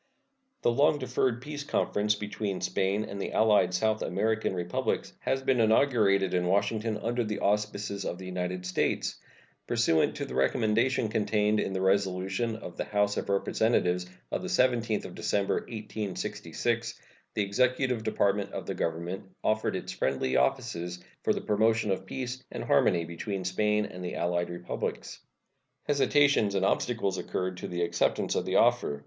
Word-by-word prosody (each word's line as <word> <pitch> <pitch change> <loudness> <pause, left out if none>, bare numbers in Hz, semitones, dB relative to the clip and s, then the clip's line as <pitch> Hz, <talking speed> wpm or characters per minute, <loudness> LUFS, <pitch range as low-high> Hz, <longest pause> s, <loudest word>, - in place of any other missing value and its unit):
The - - +4
long 145 +5 +4
deferred 125 -2 0
peace 150 0 -5
conference 105 -6 +1
between 105 -1 -3
Spain 95 +3 0
and 100 -1 -6
the - - -4
allied 105 -5 +4
South 110 +4 +1
American 110 -3 0
Republics 90 0 -2
has 135 0 -1
been 130 -2 +2
inaugurated 110 -5 +3
in 90 -1 +1
Washington 105 +3 +1
under 120 +3 -1
the 105 -2 -3
auspices 100 -1 -1
of 90 - -3
the 95 - -9
United 90 0 -3
States. 90 - -1 0.5
Pursuant 115 -10 +2
to - - -3
the 65 - -8
recommendation 110 - +2
contained 105 -1 +1
in 95 - -1
the 95 - -1
resolution 95 +3 +1
of 110 - -9
the - - -2
House 105 0 +1
of - - -3
Representatives 95 -3 +1 0.2
of - - -1
the 185 - -4
17th 120 - +1
of - - -8
December, 100 -1 0
1866, 110 +1 -3 0.4
the 105 - +2
executive 125 +3 +1
department 100 -2 0
of - - -5
the - - -3
Government 85 +3 -3 0.2
offered 110 0 +1
its - - -4
friendly 65 -1 0
offices 85 +7 0 0.2
for - - +1
the - - -1
promotion 110 0 +2
of 95 0 -2
peace 130 +2 -5
and - - -5
harmony 85 -1 +3
between 95 +3 -4
Spain 105 +3 +1
and 90 -2 -8
the 90 - -4
allied 85 0 0
Republics. 85 0 -4 0.6
Hesitations 140 -7 +3
and 95 0 +2
obstacles 100 -1 0
occurred 95 0 -3
to - - -5
the 85 0 -2
acceptance 85 0 +1
of - - -1
the - - -1
offer. 70 0 +3
105 Hz, 160 wpm, -29 LUFS, 90-115 Hz, 0.6 s, The